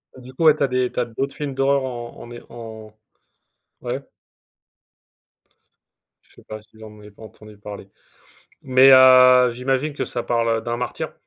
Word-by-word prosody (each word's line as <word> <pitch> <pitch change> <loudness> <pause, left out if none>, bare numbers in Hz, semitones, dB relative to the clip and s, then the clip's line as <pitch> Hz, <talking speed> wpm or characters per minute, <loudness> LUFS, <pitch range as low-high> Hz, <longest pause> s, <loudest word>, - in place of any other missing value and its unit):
Du 130 0 -14
coup, 160 +5 -2
ouais, 155 - +6
tu 145 - -2
as - - +2
des 125 -1 -2
tu - - -5
as 125 - 0
d'autres 135 +4 -5
films 145 -2 -5
d'horreur 135 +1 0
en 120 -2 -8
en 120 - -13
é 120 - -10
en 110 -2 -11 0.9
ouais. - - -5 2.2
Je - - -25
sais - - -19
pas 110 0 -10
si 105 - -25
j'en 105 -1 -13
ai 105 0 -15
pas 100 - -17
entendu 110 -1 -15
parler. 100 -1 -11 0.7
Mais, 130 +1 +5
heu, 130 -1 +6
j'imagine 130 +4 -3
que - - -4
ça 120 - -5
parle, 115 -1 -1
heu, - - -5
d'un 120 +1 -4
martyr? 125 - -6
125 Hz, 180 wpm, -20 LUFS, 110-130 Hz, 2.2 s, ouais